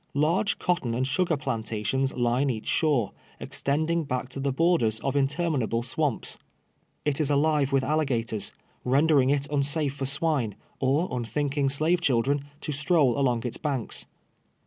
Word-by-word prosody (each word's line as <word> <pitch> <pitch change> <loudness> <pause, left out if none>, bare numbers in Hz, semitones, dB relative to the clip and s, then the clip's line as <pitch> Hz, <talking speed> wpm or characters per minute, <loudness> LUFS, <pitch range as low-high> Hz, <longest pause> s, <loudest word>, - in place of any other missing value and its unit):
Large 165 +8 +2
cotton 150 -10 0
and 130 +2 0
sugar 160 +4 +1
plantations 120 -1 -1
line 125 +3 +1
each 110 -4 -3
shore, 140 - +1 0.3
extending 160 +4 -1
ba(dv 125 -2 -3
to 135 - -7
the 140 0 0
l)t>rders 130 -7 +2
of 135 +1 -1
interminable 140 -5 0
swamps. 140 0 -1 0.7
It 150 +1 0
is 150 - 0
alive 145 -1 +2
with 135 -1 +2
aligators, 130 -7 -1 0.3
rendering 140 +1 +3
it 140 0 +1
un 145 -1 +2
safe 145 0 0
for 140 -2 -3
swine, 140 -7 0 0.2
or 140 +7 +2
unthinking 135 +4 -1
slave 160 +5 +2
children 140 0 +1 0.2
to - - -4
stroll 145 -3 +2
along 125 -4 +1
its 120 -1 -3
banks. 140 -6 -3
140 Hz, 145 wpm, -26 LUFS, 125-150 Hz, 0.7 s, rendering